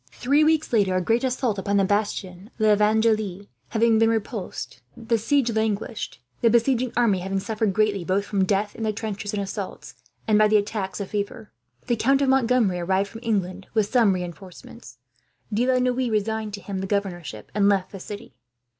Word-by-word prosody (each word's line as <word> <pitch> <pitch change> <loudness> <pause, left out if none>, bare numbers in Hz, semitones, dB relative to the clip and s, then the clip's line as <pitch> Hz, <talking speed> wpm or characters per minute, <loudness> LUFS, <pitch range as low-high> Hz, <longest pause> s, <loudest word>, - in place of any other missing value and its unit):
Three 280 +5 +2
weeks 310 -3 +2
later, 200 -4 +3
a - - +3
great 230 +7 +1
assault 250 -5 0
upon 200 +1 0
the 195 - +4
bastion 200 -1 -2
of - - -31
L'Evangile 215 -2 +2 0.2
having 225 0 +3
been 225 0 +4
repulsed, 215 - -4 0.2
the 230 0 0
siege 250 +2 +1
languished; 220 - -2 0.2
the 230 - +5
besieging 240 +1 +2
army 225 -6 +3
having 195 +2 -2
suffered 215 0 -1
greatly, 205 -2 +1
both 190 +3 0
from 200 -2 0
death 205 +2 0
in - - -9
the 220 -1 +1
trenches 205 -1 -4
and 205 -1 -2
assaults, 195 0 -6 0.3
and 215 -1 +4
by 215 - +6
the 215 0 +4
attacks 205 -2 -3
of 200 - -5
fever. 210 +2 -4 0.3
The 240 - +1
Count 275 +5 +3
of 270 - +2
Montgomery 245 -8 +2
arrived 190 +3 0
from 225 - -9
England, 195 -4 -2
with 215 -2 +1
some 230 -6 +4
reinforcements. 180 - -8 0.6
De 235 +4 +1
la 260 -1 +3
Noue 250 0 +1
resigned 215 0 -1
to 200 - -11
him 190 +1 -5
the 190 - -3
governorship, 175 - -3
and 200 0 +3
left 190 -2 +1
the 195 - -8
city. 205 +2 -9
210 Hz, 190 wpm, -24 LUFS, 195-230 Hz, 0.6 s, by